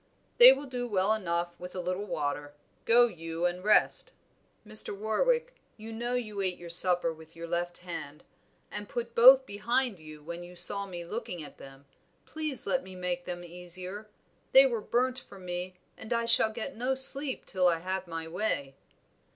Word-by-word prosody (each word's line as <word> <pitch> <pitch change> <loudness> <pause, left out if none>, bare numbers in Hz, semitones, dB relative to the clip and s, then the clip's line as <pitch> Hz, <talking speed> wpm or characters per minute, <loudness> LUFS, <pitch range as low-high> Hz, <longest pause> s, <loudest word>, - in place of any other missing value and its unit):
"They - - +12
will 290 - -2
do 250 -2 -5
well 200 -1 +1
enough 175 -4 -2
with 180 +1 -9
a - - -4
little 180 +3 -3
water; 145 -3 -4 0.3
go 240 +1 +6
you 165 -5 -5
and 175 +1 -2
rest." 215 - +2 0.5
"Mr. 215 -1 +2
Warwick, 480 - 0 0.2
you 225 +1 -9
know 240 +2 -2
you 215 -5 -4
ate 185 -2 0
your 170 -1 -10
supper 175 -1 +4
with 160 0 -16
your 165 0 -7
left 175 +1 -3
hand, 160 -4 -8 0.5
and 205 0 -7
put 235 -1 -5
both 260 +3 +8
behind 235 0 -1
you 155 -1 -13
when 170 +2 -7
you 175 +1 -12
saw 200 +3 0
me 175 -2 -7
looking 170 -1 -6
at 145 - -13
them. 135 +1 -14 0.4
Please 310 -4 -2
let 265 - +1
me 190 -5 -12
make 180 -1 -3
them 175 -1 -6
easier; 180 +4 -7 0.4
they 270 +1 +9
were 235 -4 -1
burnt 255 +3 -1
for 200 - -15
me, 180 0 -5 0.2
and 220 - -11
I 235 -1 0
shall 230 -1 +4
get 235 +5 -6
no 255 +3 -1
sleep 265 +1 +3
till 185 -1 +1
I 175 - +3
have 165 - -14
had 185 0 -3
my 165 -1 -6
way." 160 -6 -2
185 Hz, 185 wpm, -29 LUFS, 175-235 Hz, 0.5 s, They